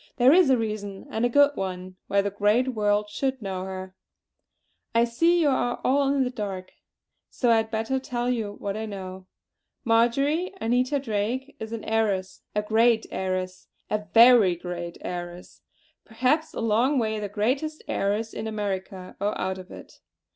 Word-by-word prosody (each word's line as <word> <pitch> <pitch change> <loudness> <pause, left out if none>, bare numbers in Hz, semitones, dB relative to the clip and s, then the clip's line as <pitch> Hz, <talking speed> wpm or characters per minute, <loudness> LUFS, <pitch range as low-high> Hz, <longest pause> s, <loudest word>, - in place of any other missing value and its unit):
There 255 +2 +6
is 360 -4 +5
a 260 - +5
reason, 210 -3 -4
and 220 - -1
a - - +2
good 285 +3 +5
one, 185 -1 -5
why 200 - +3
the 200 - -2
great 210 +6 +2
world 210 -3 +1
should 265 +3 -1
know 190 -3 -4
her. 190 0 -7 1.0
I 230 - +5
see 330 +9 +2
you 300 - +4
are 245 -2 0
all 275 +1 +2
in 280 -1 +2
the 250 - -2
dark; 195 -6 -5 0.6
so 245 -2 +1
I 230 - +5
had 220 0 0
better 225 +4 -1
tell 245 -2 -3
you 225 -5 -1
what 200 -1 -5
I 220 0 -4
know. 190 -2 -8 0.6
Marjory 275 +10 +2
Anita 250 +4 +1
Drake 250 +2 -2
is 220 0 -6
an 230 -2 -5
heiress, 205 -4 -1
a 210 - +1
great 225 +1 +3
heiress, 185 -1 -3 0.2
a 210 0 -1
very 230 -6 +7
great 175 0 -6
heiress; 175 0 -7 0.4
perhaps 260 +8 0
a - - -3
long 230 +6 +2
way 220 -3 0
the 205 -1 -4
greatest 260 +10 -1
heiress 210 +3 -1
in 220 - -4
America, 195 -3 -4
or 205 +1 -1
out 190 0 -2
of 185 0 -11
it. - - -12
220 Hz, 170 wpm, -25 LUFS, 195-250 Hz, 1.0 s, very